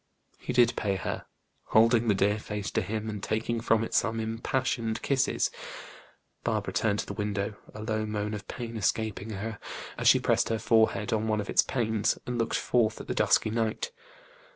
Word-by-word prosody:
He - - -4
did 120 -1 +4
pay 100 -2 0
her: 95 - -4 0.4
holding 115 +1 +4
the 105 - +4
dear 100 +2 +2
face 105 -1 -4
to - - +1
him, 110 +2 -3
and 105 -2 -4
taking 115 +2 -1
from 115 -1 +3
it - - -5
some 115 0 +2
impassioned 115 0 -1
kisses. 135 -1 +1 0.9
Barbara 105 -4 -1
turned 100 +2 +1
to - - -8
the - - -5
window, 105 0 -2 0.2
a 105 - -6
low 110 -1 -1
moan 105 0 -2
of 105 -1 -6
pain 115 -2 -5
escaping 110 +1 -1
her, 110 +1 -5 0.4
as - - +1
she - - +7
pressed - - +2
her 115 - +1
forehead 110 -2 +2
on 110 0 0
one 110 -1 +1
of 100 - -3
its - - +6
panes, 110 -4 0
and 125 -1 -3
looked 115 - 0
forth 110 -3 +1
at - - -7
the - - -2
dusky 110 - +3
night. 115 - -1
110 Hz, 190 wpm, -28 LUFS, 105-115 Hz, 0.9 s, she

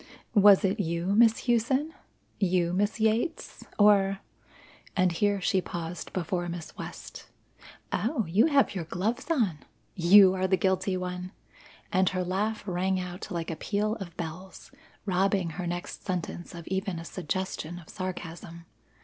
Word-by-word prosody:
Was 205 -2 +7
it 195 +3 0
you, 170 +1 -1
Miss 225 +1 +4
Hughson? 260 +6 +1 0.5
You, 180 -3 +1
Miss 205 +4 0
Yates? 225 +10 -1
or 200 -2 +5 0.4
" - - -20
and 185 -1 +3
here 205 +4 +1
she 190 +1 +1
paused 170 0 -6
before 175 0 -2
Miss 170 -1 -7
West, - - -9 0.7
"Oh, 230 0 0
you 190 - +3
have 280 -6 +3
your 180 -4 -4
gloves 220 - -2
on! 220 - +1 0.3
You 190 +2 +7
are 190 0 0
the 190 0 +2
guilty 190 +1 +1
one!" 180 +1 -5 0.6
and 185 -1 +4
her 185 -1 -2
laugh 205 +4 -1
rang 185 0 0
out 180 0 -6
like 170 -1 -3
a - - -3
peal 210 +6 -1
of 175 -4 -9
bells, 175 +3 -7 0.3
robbing 190 -2 +1
her 175 +2 -5
next 175 +1 -5
sentence 175 -1 -4
of 170 -1 -9
even 190 -1 -2
a 165 - -7
suggestion 175 -1 -4
of 170 -3 -12
sarcasm. 170 -2 -7
185 Hz, 150 wpm, -28 LUFS, 175-205 Hz, 0.7 s, Was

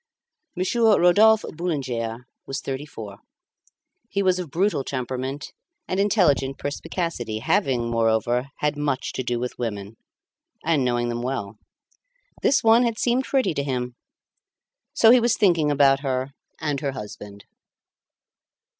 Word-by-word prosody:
Monsieur 215 +4 +3
Rodolphe 210 +5 +5
Boulanger 125 -8 -3 0.2
was 135 - -3
thirty 135 +2 -5
four; 105 -7 -9 0.9
he 200 +1 0
was 185 -1 +2
of 175 -4 -5
brutal 180 -1 0
temperament 130 +2 -4 0.3
and 185 - -2
intelligent 170 -10 +2
perspicacity, 145 - -4
having, 130 - 0
moreover, 115 +2 +1
had 150 0 +1
much 145 -3 -2
to - - -2
do 120 -1 -2
with 125 +1 -5
women, 105 -2 -5 0.7
and 160 -4 +2
knowing 120 -1 0
them 120 0 -3
well. 115 -5 -4 0.8
This 280 - +3
one 225 +1 +6
had 235 -2 0
seemed 250 +3 +1
pretty 265 - +1
to 140 - -1
him; 125 -3 -3 1.0
so 225 - +7
he 250 - +7
was 235 -1 +1
thinking 170 -8 +3
about 140 -1 +4
her 130 -1 -2 0.3
and 150 -3 -2
her 140 -2 -2
husband. 105 -4 -9
140 Hz, 135 wpm, -24 LUFS, 120-180 Hz, 1.0 s, so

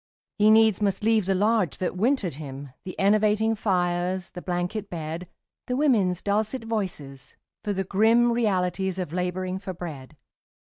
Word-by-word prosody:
He 210 +1 +6
needs 220 -2 +5
must 200 0 0
leave 220 -3 +2
the 195 - +2
lodge 210 -3 +1
that 185 - -2
wintered 215 - +1
him, 140 -1 -8 0.2
The 185 - -7
enervating 215 +2 +3
fires, 180 -3 -1
the 180 - -8
blanket 180 +4 -3
bed 165 +1 -5 0.4
The 250 - -1
women's 215 - +2
dulcet 215 +4 -1
voices, 165 - -5 0.3
for 210 - -1
the 195 -1 -1
grim 225 +5 +3
Realities 190 -4 0
of 180 -4 -4
labouring 185 +1 -2
for 190 -1 -6
bread. 155 -4 -8
190 Hz, 150 wpm, -25 LUFS, 180-215 Hz, 0.4 s, He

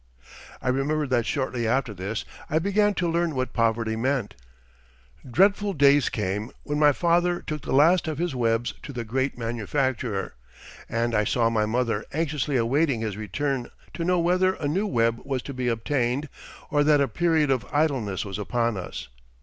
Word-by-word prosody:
I 125 - 0
remember 145 +4 0
that 120 -4 0
shortly 130 -4 -1
after 125 -1 0
this 100 +4 -4 0.2
I 155 - +1
began 200 +4 +2
to 180 - 0
learn 170 -2 0
what 130 -1 -2
poverty 115 -1 +1
meant. 125 -1 -1 1.0
Dreadful 200 - +3
days 140 -2 +4
came 105 +2 -2
when 145 0 -2
my 150 -1 +6
father 175 +3 +2
took 155 -1 -5
the - - -6
last 165 +6 +4
of 155 -2 -2
his 170 -1 -1
webs 115 -1 0
to 145 - -8
the 120 -2 -4
great 130 +4 -1
manufacturer, 120 -2 -2 0.6
and 115 +1 0
I 105 -1 +3
saw 115 +2 +1
my 110 -2 +1
mother 115 -2 0
anxiously 150 -2 -1
awaiting 130 +1 +1
his 110 -3 -3
return 125 +5 -2 0.2
to 170 - -3
know 180 +1 +2
whether 185 +2 +2
a 145 - -3
new 190 +8 0
web 115 - +1
was 135 -3 -3
to 140 - -6
be 125 -1 -2
obtained 125 +4 0 0.4
or 145 -1 +3
that 150 0 +4
a 140 - +3
period 155 +3 +2
of 120 -6 0
idleness 135 - 0
was 100 0 -5
upon 115 +1 0
us. 90 - -6
130 Hz, 175 wpm, -25 LUFS, 115-155 Hz, 1.0 s, my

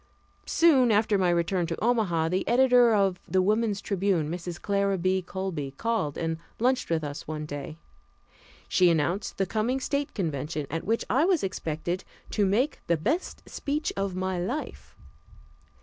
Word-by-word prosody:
Soon 280 -7 +5
after 215 0 +3
my 180 -1 +3
return 175 +1 +1
to 165 - -4
Omaha, 205 -9 +1
the 185 +2 -1
editor 245 -1 +5
of 195 -4 +2
the 190 - +1
Woman's 210 +1 +1
Tribune, 190 -6 0
Mrs. 175 0 -5
Clara 200 -1 +1
B. 185 +1 +1
Colby, 180 -6 -4
called 225 -11 -1
and 165 -1 -2 0.2
lunched 255 +2 +1
with 165 -2 0
us 145 0 -6
one 155 0 -4
day. 145 +1 -6 0.9
She 180 -1 +4
announced 170 +5 0
the 195 - +1
coming 225 +7 0
State 280 +1 -2
convention, 155 -4 -2
at 165 +1 -3
which 225 +2 0
I 265 - +3
was 365 -4 +2
expected 175 -1 -3 0.3
"to 205 -2 +2
make 240 +10 +1
the 170 - +2
best 300 - -2
speech 300 +2 -2
of 195 -2 -2
my 185 -1 -2
life." 245 +13 -5
190 Hz, 160 wpm, -27 LUFS, 170-230 Hz, 0.9 s, Soon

